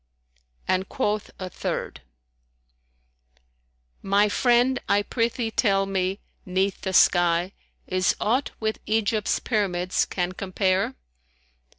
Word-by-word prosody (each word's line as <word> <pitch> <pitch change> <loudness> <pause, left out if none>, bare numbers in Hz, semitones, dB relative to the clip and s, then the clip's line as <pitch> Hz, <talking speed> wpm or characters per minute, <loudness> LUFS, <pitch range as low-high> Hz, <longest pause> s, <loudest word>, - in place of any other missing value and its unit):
And 185 +1 0
quoth 210 -5 -1
a 185 - -5
third, 160 - -4 2.0
"My 200 +2 +3
friend 245 +3 +3
I 205 +1 +3
prithee 230 0 -1
tell 195 -4 +2
me, 190 0 -1 0.2
'neath 190 +1 -1
the 190 - -3
sky 175 0 +4 0.2
* - - -46
Is 185 0 +1
aught 250 +6 +1
with 220 0 -2
Egypt's 215 0 +1
Pyramids 185 -5 0
can 180 -1 -2
compare? 185 0 0
195 Hz, 105 wpm, -25 LUFS, 185-220 Hz, 2.0 s, sky